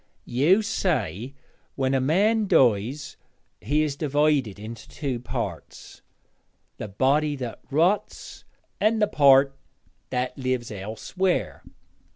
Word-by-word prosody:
'You 160 Hz, -, +3 dB
say 130 Hz, -, -2 dB, 0.4 s
when 135 Hz, 0 st, 0 dB
a 135 Hz, -, +2 dB
man 205 Hz, -, +2 dB
dies 130 Hz, -, +1 dB, 0.4 s
he 145 Hz, +10 st, +1 dB
is 145 Hz, -3 st, -2 dB
divided 145 Hz, -, +1 dB
into 110 Hz, +2 st, -9 dB
two 135 Hz, -5 st, -4 dB
parts 120 Hz, -, -6 dB, 0.8 s
the -, -, -6 dB
body 140 Hz, +8 st, +1 dB
that 125 Hz, -4 st, -6 dB
rots 170 Hz, +8 st, -1 dB, 0.4 s
and 220 Hz, +1 st, +2 dB
the 210 Hz, -, +4 dB
part 135 Hz, -3 st, +5 dB, 0.5 s
"that 125 Hz, 0 st, -2 dB
lives 130 Hz, -3 st, -2 dB
elsewhere."' 110 Hz, -, -2 dB
135 Hz, 110 wpm, -25 LUFS, 120-155 Hz, 0.8 s, part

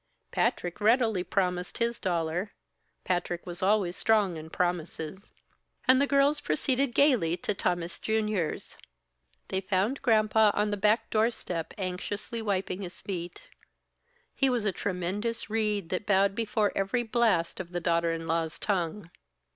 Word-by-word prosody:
Patrick 175 Hz, +4 st, -1 dB
readily 220 Hz, -3 st, +3 dB
promised 180 Hz, -2 st, -1 dB
his 235 Hz, 0 st, 0 dB
dollar 175 Hz, +2 st, -1 dB, 0.5 s
Patrick 175 Hz, -1 st, -2 dB
was 175 Hz, -1 st, -6 dB
always 190 Hz, -2 st, +2 dB
strong 210 Hz, -5 st, +2 dB
in 160 Hz, 0 st, -8 dB
promises 175 Hz, +1 st, -3 dB, 0.6 s
and 255 Hz, +1 st, +6 dB
the 280 Hz, -, +3 dB
girls 280 Hz, +1 st, +3 dB
proceeded 250 Hz, -, 0 dB
gaily 235 Hz, -, +4 dB
to 210 Hz, -, -2 dB
Tammas 175 Hz, -3 st, -2 dB
Junior's. 215 Hz, -6 st, -1 dB, 0.7 s
They 190 Hz, -, -1 dB
found 195 Hz, +7 st, 0 dB
Granpa 220 Hz, -3 st, +4 dB
on 210 Hz, 0 st, +1 dB
the -, -, +1 dB
back 210 Hz, +3 st, +2 dB
doorstep 215 Hz, -7 st, -1 dB
anxiously 200 Hz, +4 st, -4 dB
wiping 195 Hz, -2 st, -2 dB
his 180 Hz, -2 st, -6 dB
feet; 175 Hz, -3 st, -6 dB, 0.9 s
he 270 Hz, -, +2 dB
was 240 Hz, -4 st, 0 dB
a 205 Hz, -, +2 dB
tremulous 200 Hz, +5 st, -3 dB
reed 210 Hz, -5 st, 0 dB
that 185 Hz, +2 st, -3 dB
bowed 195 Hz, 0 st, +4 dB
before 215 Hz, -1 st, 0 dB
every 195 Hz, +5 st, 0 dB
blast 225 Hz, -7 st, +1 dB
of 175 Hz, -2 st, -6 dB
the 175 Hz, -, -2 dB
daughter 170 Hz, -1 st, +1 dB
in 165 Hz, 0 st, -4 dB
law's 165 Hz, -1 st, -1 dB
tongue. 180 Hz, -2 st, -2 dB
195 Hz, 140 wpm, -28 LUFS, 175-220 Hz, 0.9 s, and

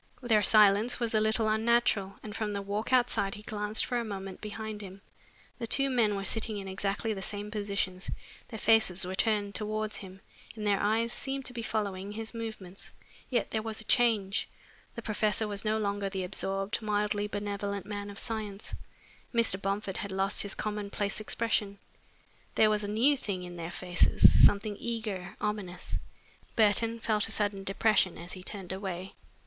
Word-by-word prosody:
Their 225 Hz, -3 st, +4 dB
silence 210 Hz, +3 st, +5 dB
was 235 Hz, -2 st, -1 dB
a 215 Hz, -, +3 dB
little 220 Hz, +1 st, +2 dB
unnatural 220 Hz, -3 st, +2 dB
and 210 Hz, -2 st, -7 dB
from 210 Hz, -2 st, -2 dB
the 200 Hz, -, -2 dB
walk 205 Hz, +4 st, -3 dB
outside 240 Hz, -6 st, +2 dB
he 210 Hz, -, -10 dB
glanced 210 Hz, 0 st, +1 dB
for 245 Hz, -1 st, 0 dB
a -, -, -1 dB
moment 195 Hz, -3 st, -6 dB
behind 215 Hz, 0 st, -5 dB
him. 195 Hz, 0 st, -10 dB, 0.6 s
The 230 Hz, -, -3 dB
two 275 Hz, +3 st, +3 dB
men 225 Hz, -5 st, +3 dB
were 195 Hz, 0 st, -3 dB
sitting 220 Hz, +1 st, +1 dB
in 195 Hz, -1 st, -6 dB
exactly 195 Hz, +3 st, -1 dB
the 195 Hz, -, -6 dB
same 205 Hz, +1 st, -4 dB
positions, 200 Hz, -3 st, -2 dB, 0.4 s
their 220 Hz, -, -7 dB
faces 215 Hz, -5 st, +4 dB
were 185 Hz, -, -4 dB
turned 205 Hz, 0 st, +1 dB
towards 215 Hz, +1 st, -2 dB
him, 190 Hz, -1 st, -10 dB, 0.3 s
and 215 Hz, -1 st, -5 dB
their 205 Hz, -1 st, +2 dB
eyes 225 Hz, +3 st, +1 dB
seemed 270 Hz, -1 st, -4 dB
to 245 Hz, -, -2 dB
be 235 Hz, -, -4 dB
following 205 Hz, -3 st, -2 dB
his 225 Hz, +2 st, -6 dB
movements. 220 Hz, -5 st, -6 dB, 0.4 s
Yet 245 Hz, -, 0 dB
there 220 Hz, -, 0 dB
was 220 Hz, 0 st, -4 dB
a -, -, -2 dB
change. 215 Hz, -4 st, +2 dB, 0.5 s
The 235 Hz, -, -6 dB
professor 215 Hz, -1 st, 0 dB
was 205 Hz, -1 st, -3 dB
no 215 Hz, 0 st, +1 dB
longer 200 Hz, -2 st, -1 dB
the 190 Hz, -1 st, -3 dB
absorbed, 195 Hz, +3 st, -2 dB
mildly 210 Hz, -1 st, 0 dB
benevolent 200 Hz, -1 st, -3 dB
man 205 Hz, -1 st, -5 dB
of 200 Hz, -, -9 dB
science. 215 Hz, -3 st, -4 dB, 0.6 s
Mr. 230 Hz, -5 st, +3 dB
Bomford 195 Hz, 0 st, -2 dB
had 200 Hz, -, -4 dB
lost 195 Hz, +1 st, +1 dB
his 200 Hz, -, -1 dB
commonplace 205 Hz, -1 st, -2 dB
expression. 215 Hz, -2 st, -1 dB, 0.8 s
There 215 Hz, -1 st, +5 dB
was 210 Hz, 0 st, +1 dB
a 205 Hz, -, -3 dB
new 240 Hz, +8 st, +4 dB
thing 200 Hz, -8 st, -4 dB
in 175 Hz, 0 st, -8 dB
their 170 Hz, -1 st, -5 dB
faces, 180 Hz, 0 st, +5 dB
something 205 Hz, +1 st, +5 dB
eager, 215 Hz, -5 st, -4 dB
ominous. 185 Hz, -, -3 dB, 0.6 s
Burton 225 Hz, +1 st, +3 dB
felt 215 Hz, -2 st, +1 dB
a -, -, -4 dB
sudden 205 Hz, -2 st, -1 dB
depression 195 Hz, -1 st, +2 dB
as 175 Hz, +2 st, -8 dB
he 185 Hz, -, -8 dB
turned 190 Hz, -1 st, -6 dB
away. 190 Hz, -1 st, -5 dB
210 Hz, 175 wpm, -30 LUFS, 195-220 Hz, 0.8 s, silence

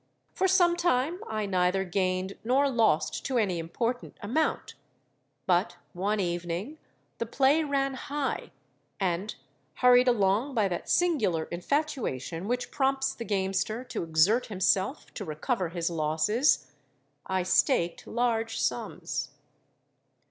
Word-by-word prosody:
For 380 Hz, -, +1 dB
some 350 Hz, -2 st, +4 dB
time 340 Hz, 0 st, +1 dB
I 215 Hz, -1 st, -2 dB
neither 185 Hz, 0 st, +1 dB
gained 185 Hz, +1 st, -1 dB
nor 265 Hz, +5 st, +3 dB
lost 225 Hz, -10 st, +1 dB
to 265 Hz, -2 st, 0 dB
any 190 Hz, -7 st, +1 dB
important 230 Hz, +9 st, -3 dB
amount; 265 Hz, +10 st, -1 dB, 0.7 s
but 175 Hz, -1 st, +2 dB, 0.2 s
one 205 Hz, +4 st, -1 dB
evening 175 Hz, -, -3 dB, 0.4 s
the 230 Hz, -, -2 dB
play 275 Hz, +6 st, +3 dB
ran 275 Hz, -2 st, 0 dB
high, 285 Hz, +1 st, -3 dB, 0.5 s
and—hurried 195 Hz, -, +1 dB
along 230 Hz, +4 st, +2 dB
by 215 Hz, -3 st, +3 dB
that 175 Hz, -, -4 dB
singular 225 Hz, -, +2 dB
infatuation 180 Hz, -, -2 dB
which 245 Hz, +1 st, -2 dB
prompts 270 Hz, 0 st, +1 dB
the 230 Hz, -, -7 dB
gamester 195 Hz, +3 st, -1 dB
to 250 Hz, -, -5 dB
exert 170 Hz, +9 st, +3 dB
himself 190 Hz, -5 st, 0 dB
to -, -, -5 dB
recover 175 Hz, -, -2 dB
his 170 Hz, 0 st, -2 dB
losses—I 155 Hz, -, -1 dB
staked 185 Hz, -, +1 dB
large 225 Hz, -1 st, 0 dB
sums. -, -, -2 dB
210 Hz, 115 wpm, -28 LUFS, 175-255 Hz, 0.7 s, some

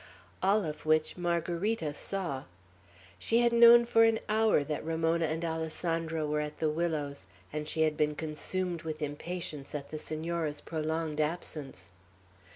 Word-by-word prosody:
All 195 Hz, +1 st, +3 dB
of 150 Hz, -1 st, -5 dB
which 155 Hz, 0 st, +3 dB
Margarita 175 Hz, 0 st, -1 dB
saw. 160 Hz, -5 st, -3 dB, 0.7 s
She 230 Hz, -, +2 dB
had 235 Hz, -1 st, +3 dB
known 235 Hz, 0 st, +8 dB
for 225 Hz, -1 st, +5 dB
an 225 Hz, 0 st, +4 dB
hour 215 Hz, -7 st, +3 dB
that 150 Hz, 0 st, -3 dB
Ramona 165 Hz, +1 st, +1 dB
and 160 Hz, +2 st, -2 dB
Alessandro 160 Hz, 0 st, -2 dB
were 150 Hz, 0 st, 0 dB
at 150 Hz, 0 st, -5 dB
the 155 Hz, -1 st, +1 dB
willows, 150 Hz, -, -2 dB, 0.3 s
and 150 Hz, 0 st, -3 dB
she 160 Hz, 0 st, +1 dB
had 155 Hz, -1 st, +1 dB
been 150 Hz, 0 st, +1 dB
consumed 170 Hz, +3 st, -3 dB
with 155 Hz, -1 st, -4 dB
impatience 150 Hz, -1 st, -5 dB
at 140 Hz, -1 st, -6 dB
the 155 Hz, -, -4 dB
Senora's 155 Hz, -1 st, -3 dB
prolonged 160 Hz, -1 st, -2 dB
absence. 150 Hz, -, -4 dB
160 Hz, 150 wpm, -31 LUFS, 150-175 Hz, 0.7 s, known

